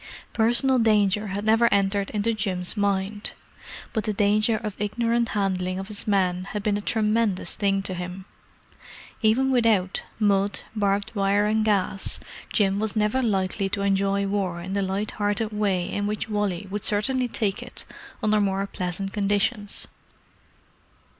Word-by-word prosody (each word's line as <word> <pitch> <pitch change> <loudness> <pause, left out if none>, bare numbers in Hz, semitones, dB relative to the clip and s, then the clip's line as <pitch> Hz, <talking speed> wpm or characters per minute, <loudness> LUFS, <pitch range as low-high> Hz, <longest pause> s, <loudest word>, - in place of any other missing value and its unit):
Personal 240 +3 +3
danger 210 -2 +3
had 200 +2 -4
never 225 +2 +4
entered 200 0 +1
into 215 +2 0
Jim's 190 -4 -2
mind; 205 0 -1 0.6
but 220 - 0
the 215 - 0
danger 210 +2 +3
of 215 -2 -4
ignorant 235 +3 0
handling 185 -3 -1
of 190 +2 -6
his 210 0 -7
men 185 -3 +1
had 205 +1 -5
been 210 -1 +1
a 205 - -2
tremendous 215 -2 +1
thing 195 -2 +1
to 190 - -3
him. 180 +1 -6 1.0
Even 250 +4 +3
without 220 -7 +2 0.2
"mud, 200 -1 +1
barbed 200 -1 0
wire, 200 0 +2
and 215 +1 +2
gas" 195 -2 0 0.3
Jim 200 -2 +2
was 215 0 -1
never 215 +4 +1
likely 195 -3 0
to 200 - -2
enjoy 200 0 +1
war 195 -3 -1
in 185 +3 -6
the 200 - 0
light 195 +2 -1
hearted 205 +1 0
way 200 -4 0
in 205 0 -2
which 210 0 -2
Wally 205 -3 -1
would 205 0 -3
certainly 250 +5 +1
take 210 -4 -1
it - - -7 0.4
under 215 0 +3
more 195 0 0
pleasant 190 0 -3
conditions. 205 +1 -1
205 Hz, 155 wpm, -25 LUFS, 195-215 Hz, 1.0 s, never